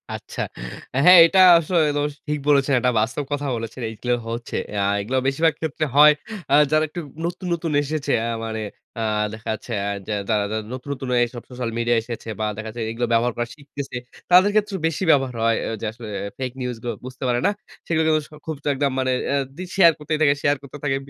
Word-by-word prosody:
আচ্ছা। - - -7 0.6
হ্যাঁ, 180 0 +10
এটা 190 +3 +3 0.2
আস 165 -2 -2 0.3
ওস 145 0 -2
ঠিক 150 0 -1
বলেছেন। 140 -1 +4
এটা 125 +1 +2
বাস্তব 125 +7 -1
কথা 145 0 -2
বলেছেন, 115 +2 -6
এইগুলো 120 +3 -2 0.2
হচ্ছে। 115 +1 -5 0.2
অ্যা 100 -1 -1 0.2
এগুলো 125 +6 -2
বেশিরভাগ 160 +4 +2
ক্ষেত্রে 155 -1 -1
হয় 150 +1 +8 0.4
অ্যা 140 - +5 0.2
যারা 155 0 +4
একটু 175 - -6 0.3
নতুন, 180 +2 -4
নতুন 165 -1 -2
এসেছে 145 -1 -2
অ্যা 115 +1 -1
মানে 110 -1 -4 0.3
অ্যা 115 - -3 0.3
দেখা 110 +1 -7
যাচ্ছে 110 +3 -8
অ্যা 100 0 -1 0.4
যারা 105 -2 +2 0.3
নতুন, 130 +2 -8
নতুন 130 -1 -7 0.2
এসব 120 0 -5
সোশ্যাল 125 -2 -4
মিডিয়া 120 0 +2
এসেছে 115 0 -7
বা 110 - 0
দেখা 110 0 -6
যাচ্ছে 120 +1 -6
এগুলো 120 +1 -2
ব্যবহার 120 +1 +2
করা 120 0 -1
শিখতেছে। 140 -3 -7 0.3
তাদের 185 +3 +7
ক্ষেত্রেও 210 -2 +1
বেশি 165 +3 -3
ব্যবহার 135 -4 +2
হয় 115 -1 +3 0.2
যে, - - -3
আসলে 115 -1 -9 0.3
ফেক 130 -1 -3
নিউজ 125 -1 -3
গুলো 120 - -2
বুঝতে 130 +1 -8
পারে 120 -1 +1
না। - - +3 0.4
সেগুলো 160 -1 +2 0.4
খুব 160 - -3 0.2
একদম 140 0 0
মানে 130 0 +1 0.2
অ্যা 140 - +2 0.2
রিল 185 -1 -6
শেয়ার 170 -4 +8
করতেই 155 +1 -2
থাকে, 140 -2 +5
শেয়ার 145 0 +3
করতে 140 +1 -10
থাকে। 135 -2 +1
135 Hz, 195 wpm, -22 LUFS, 120-150 Hz, 0.6 s, হ্যাঁ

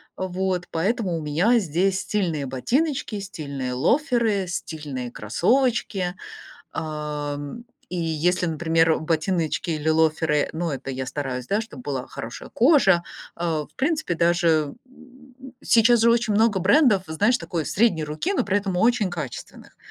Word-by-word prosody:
Вот 185 -1 -2
поэтому 190 +1 0
у 160 - -4
меня 175 +11 +2
здесь 190 +1 +1
стильные 170 -9 -1
ботиночки, 240 - -1
стильные 140 -9 -5
лоферы, 225 - +1
стильные 150 -8 -5
кроссовочки. 190 - 0 0.6
Ам, 150 +4 -4 0.3
и 180 - -5
если, 170 +2 0
например, 165 0 +2
ботиночки 160 +1 -1
или 155 -1 -3
лоферы, 160 -1 +2
ну, 165 0 -2
это 135 0 -5
я 130 0 -4
стараюсь, 130 -2 -4
да, 205 +2 +1
чтобы 145 - -10
была 135 -3 -3
хорошая 115 +2 -8
кожа, 235 - +4 0.4
э, 170 - -5 0.3
в - - -34
принципе, 300 - 0
даже, 165 -3 +2 0.2
м, 260 0 -18 0.3
сейчас 235 -1 +5
же 230 +1 +5
очень 235 -2 +1
много 215 -2 +3
брендов, 205 - +4
знаешь, 205 +10 +2
такой 170 - -4
средней 190 -5 +2
руки, 155 - -2
но - - +1
при 200 +1 +1
этом 195 -2 -2
очень 225 +1 +2
качественных, 150 -8 -8
175 Hz, 140 wpm, -24 LUFS, 155-220 Hz, 0.6 s, сейчас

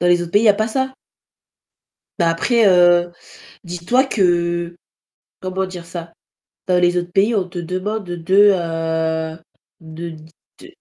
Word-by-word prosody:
dans 175 - +1
les 175 0 +4
autres 170 -1 -8
pays, 205 - +4
il - - +1
y - - +7
a 205 - +6
pas 215 +2 -1
ça? 265 +3 -2 1.3
Mais 170 - +3
après, 220 +8 +2
heu, 175 -1 +4 0.5
dis-toi 175 +10 0
que, 175 -6 0 0.6
comment 185 +1 -3
dire 180 -2 -9
ça? 170 -1 -8 0.6
Dans 180 -1 +2
les 175 0 +2
autres 175 0 -3
pays, 205 +5 +2
on 195 -4 0
te 175 - -7
demande 185 +5 -3
de, 175 +1 -3 0.2
heu, 160 -2 -2 0.4
de 165 0 -8 0.4
te - - -14
175 Hz, 155 wpm, -19 LUFS, 170-190 Hz, 1.3 s, y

